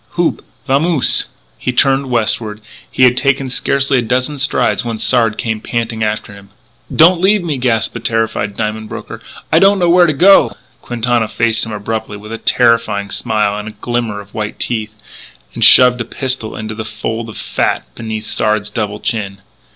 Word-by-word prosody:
Houp! 175 -1 0 0.2
Vamose!" 145 +2 +2 0.3
He 125 - -2
turned 135 +1 +1
westward; 110 -2 0
but - - -27 0.2
he 130 - 0
had 125 -1 +6
taken 135 0 0
scarcely 140 0 +1
a - - 0
dozen 130 +5 -1
strides 140 -1 +1
when 115 -2 -4
Sard 115 -1 +1
came 110 -2 -3
panting 115 -1 -3
after 105 -1 -3
him: 100 -1 -15 0.4
"Don't 170 +2 +5
leave 200 +1 +3
me!" 155 -5 -2
gasped 115 -4 0
the 115 - -5
terrified 115 -2 -2
diamond 110 0 -3
broker. - - -8 0.3
"I - - +5
don't 200 +1 +5
know 175 -2 +2
where 175 0 +5
to 155 - +1
go 170 - +5
" 115 +3 -36
Quintana 120 -1 -1
faced 115 0 0
him - - -7
abruptly 110 0 -4
with 105 +2 -11
a 115 - -5
terrifying 115 -5 +1
smile 105 -3 0
and 105 0 -9
glimmer 120 -4 -2
of 100 0 -13
white 105 -1 -4
teeth 110 -2 -4 0.6
and - - -1
shoved 125 -1 +7
a - - -3
pistol 130 -2 -3
into 110 0 -5
the 110 +1 -5
fold 110 +1 -5
of 110 - -10
fat - - -1
beneath 110 -2 -6
Sard's 105 -1 0
double 105 -2 -3
chin. 100 -4 -3
115 Hz, 180 wpm, -15 LUFS, 110-130 Hz, 0.6 s, shoved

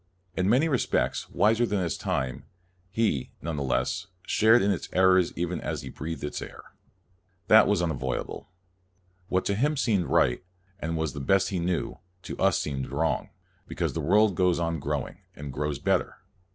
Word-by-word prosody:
In 95 +1 +1
many 130 +8 +4
respects 135 -6 0
wiser 110 +3 +3
than 105 -4 0
his 85 -3 -1
time, 65 +1 -3 0.4
he, 100 - 0
never 80 -2 -4
theless, 65 +7 -1 0.2
shared 110 0 +4
in 100 - +3
its 95 - -3
errors, 95 -1 +4
even 85 -1 -2
as - - -4
he - - -7
breathed 80 -1 -6
its 75 - -4
air. - - -10 0.8
That - - +8
was 85 - +2
unavoidable. 65 -6 -3 0.8
What 95 0 0
to 100 - +1
him 145 +8 +1
seemed 105 - +1
right, - - +2 0.4
and 85 -2 -2
was 80 -4 -2
the - - -6
best 95 +8 +2
he 95 - -2
knew, 85 -3 -2 0.2
to - - -6
us 95 -3 +3
seems 65 -3 -3
wrong; 75 +5 -1 0.4
because - - -2
the - - -2
world 105 0 +4
goes 90 0 +2
on 85 -1 -1
growing, 70 0 -3 0.2
and 75 -2 -7
grows 75 +1 -2
better. - - 0
85 Hz, 170 wpm, -27 LUFS, 75-100 Hz, 0.8 s, That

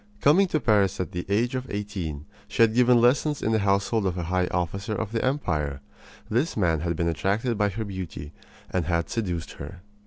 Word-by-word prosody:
Coming 175 - +5
to 155 - 0
Paris 105 -7 +2
at 90 - -2
the 90 0 -5
age 115 +5 +1
of 130 0 -3
eighteen, 95 -8 -4 0.2
she - - +3
had 110 -1 +3
given 125 0 +5
lessons 140 +5 +2
in 110 - +1
the 110 - +3
household 100 +1 +1
of 90 -1 -2
a 90 - -2
high 90 +2 0
officer 100 +5 -2
of 110 -1 -3
the 115 - -1
empire. 75 - -1 0.5
This 125 +8 0
man 85 -6 +2
had 85 +1 -1
been 85 +1 0
attracted 100 - 0
by 105 -1 +2
her 110 +3 -4
beauty, 95 -6 -6 0.4
and 90 -3 0
had 85 0 -1
seduced 90 -8 -2
her. 90 +6 -9
100 Hz, 205 wpm, -26 LUFS, 85-115 Hz, 0.5 s, Coming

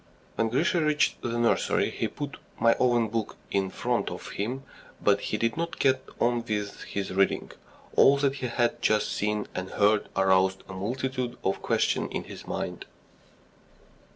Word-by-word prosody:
When 115 - 0
Grisha 165 +8 +2
reached 150 -1 +2
the 120 0 -2
nursery, 120 0 +2
he - - -1
put 145 -1 -6 0.2
"My 115 0 +5
Own 120 -2 +3
Book" 110 -1 -3
in 95 -1 +1
front - - -1
of - - -7
him, 125 +7 -3 0.4
but 100 -1 +3
he 105 - -2
did 115 +1 0
not 170 0 -2
get 130 -1 +3 0.2
on 120 0 +2
with 105 -2 -3
his 100 -1 -3
reading. 95 +1 +1 0.4
All 140 +1 +7
that 140 -1 +1
he 130 - -2
had 120 0 0
just 110 0 +2
seen 105 0 -1
and 95 0 -4
heard 105 +1 +2
aroused 95 0 +3
a 95 - -8
multitude 125 +5 -3
of 95 - 0
questions - - +1
in - - -3
his - - -10
mind. - - -4
115 Hz, 165 wpm, -27 LUFS, 100-130 Hz, 0.4 s, All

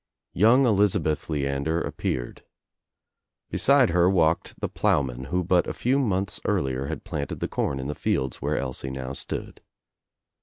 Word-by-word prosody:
Young 115 +8 +5
Elizabeth 100 - +2
Leander 70 +2 -1
appeared. - - -4 1.1
Beside 140 -5 +4
her 90 +1 +4
walked 85 -4 +1
the - - -1
ploughman 65 -2 0
who 90 +6 -1
but 90 +1 +2
a - - -4
few 130 +3 +1
months 100 -6 -1
earlier 70 -10 0
had 80 - -5
planted 75 -4 -4
the - - -2
corn 70 - -2
in 65 - -4
the 75 - -2
field 65 -3 -1
where - - -1
Elsie 65 0 -3
now 65 0 -5
stood. - - -6
80 Hz, 150 wpm, -25 LUFS, 70-95 Hz, 1.1 s, Young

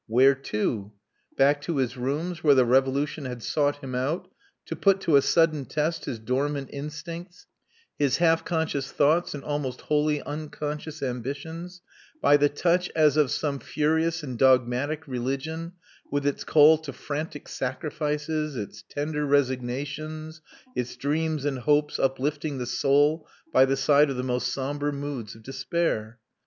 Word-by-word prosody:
Where 130 +5 +5
to? 105 -5 -3 0.4
Back 145 +1 +4
to 150 +1 -2
his 130 -2 0
rooms, 155 +8 -3
where 145 -3 +6
the 130 -2 +5
Revolution 135 +4 +1
had 125 -3 -6
sought 145 -1 0
him 130 -1 -5
out 135 +7 -2 0.3
to - - -4
put 195 -1 +3
to 160 - +3
a 140 - +7
sudden 155 -2 +2
test 155 +3 -1
his 120 - -3
dormant 135 +4 -2
instincts, 165 +5 -7 0.5
his 140 -3 +2
half 165 -1 +3
conscious 160 -5 -2
thoughts 155 +3 +2
and 140 - -7
almost 145 -4 -3
wholly 150 0 +1
unconscious 150 0 -5
ambitions, 155 +8 -5 0.4
by 145 - +5
the 145 0 +4
touch 175 +4 +1
as 155 -3 +4
of 150 -4 +3
some 140 0 -1
furious 160 +3 0
and 130 -5 -6
dogmatic 130 +4 +2
religion, 135 +7 -3 0.4
with 145 0 -1
its 145 - 0
call 155 +1 +6
to 155 -3 -7
frantic 145 +2 -5
sacrifices, 150 +2 -2
its 105 -4 -6
tender 150 +1 -2
resignations, 145 +4 -1 0.3
its 125 0 -3
dreams 155 +1 -1
and 135 -3 -1
hopes 150 +3 +2
uplifting 145 +2 -1
the 125 - -3
soul 145 +6 +2 0.3
by 130 -1 +7
the 135 0 0
side 145 +1 +4
of 135 - -3
the 125 - -2
most 125 -1 -1
sombre 145 +2 -2
moods 140 -6 -5
of 110 - -15
despair. 130 -4 -2
145 Hz, 150 wpm, -26 LUFS, 130-155 Hz, 0.5 s, a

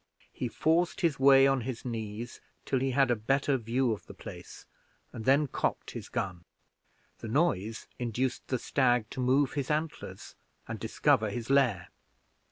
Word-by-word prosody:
He 125 - -3
forced 165 +8 +1
his 160 -7 +1
way 135 0 +7
on 135 -1 +3
his 125 +1 -5
knees 115 -1 -5 0.2
till 135 - +1
he 135 +1 0
had 130 -1 +3
a - - +3
better 135 +5 +1
view 120 +1 0
of 105 - -5
the - - -11
place, - - -10 0.5
and 110 - -7
then 140 +3 +4
cocked 135 - -2
his - - -8
gun. 90 -3 -3 0.8
The 115 - -7
noise 110 - 0
induced 125 +2 -2
the 130 - 0
stag 120 -3 +1
to - - -6
move 130 +2 +3
his 140 -2 -3
antlers, 155 +1 -3 0.3
and - - -5
discover 110 -1 +2
his 115 +4 -4
lair. 125 -10 +2
125 Hz, 165 wpm, -30 LUFS, 115-135 Hz, 0.8 s, way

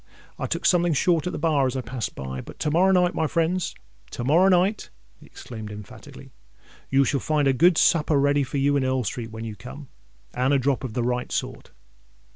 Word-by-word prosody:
"I - - -2
took - - -3
something 175 -2 +3
short 165 +2 +1
at - - -2
the - - -5
bar 150 -4 +2
as 130 +1 -3
I - - -2
passed 120 -2 -5
by; 65 -1 -6
but - - -12
to 150 - -1
morrow 180 +5 +4
night, 180 -1 +3
my 160 - 0
friends—to 160 - -3
morrow 165 +9 +4
night," 190 +3 +1 0.3
he - - -17
exclaimed 110 -3 -9
emphatically, 105 -1 -12 0.6
"you 135 0 +3
shall 140 +2 0
find 150 -1 0
a 135 - +3
good 170 +5 +4
supper 155 -3 +3
ready 145 +1 +2
for 135 +1 -3
you 140 +1 +2
in 140 - +1
Earl 130 -1 0
Street 115 +2 -4
when 110 0 -7
you 110 -2 -6
come, 130 +6 -11 0.4
and 130 +3 +1
a - - +4
drop 135 0 0
of 125 -4 -5
the 120 - -1
right 125 +1 -2
sort." - - -4
140 Hz, 215 wpm, -24 LUFS, 125-165 Hz, 0.6 s, morrow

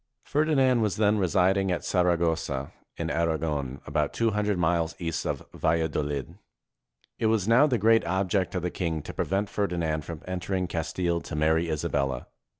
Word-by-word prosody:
Ferdinand 140 -5 +2
was 105 -3 +1
then 105 0 +3
residing 95 +1 +2
at 90 - -2
Saragossa, 80 -6 0 0.3
in - - -2
Aragon, 75 -5 -1
about - - -1
two 115 -1 +1
hundred 105 -1 0
miles 85 -1 +1
east 80 -2 -3
of - - -3
Valladolid. 75 -4 -1 0.8
It 110 - +2
was 110 -3 +1
now 125 +6 +6
the 125 -5 +1
great 115 +2 +4
object 95 +1 0
of 90 - -2
the 90 - -1
king 80 -4 -2
to - - -7
prevent 100 +2 -1
Ferdinand 85 -7 -1
from 80 0 -8
entering 90 0 -2
Castile 85 +1 -1
to - - -7
marry 80 +2 +2
Isabella. 70 -4 -1
90 Hz, 155 wpm, -27 LUFS, 80-100 Hz, 0.8 s, now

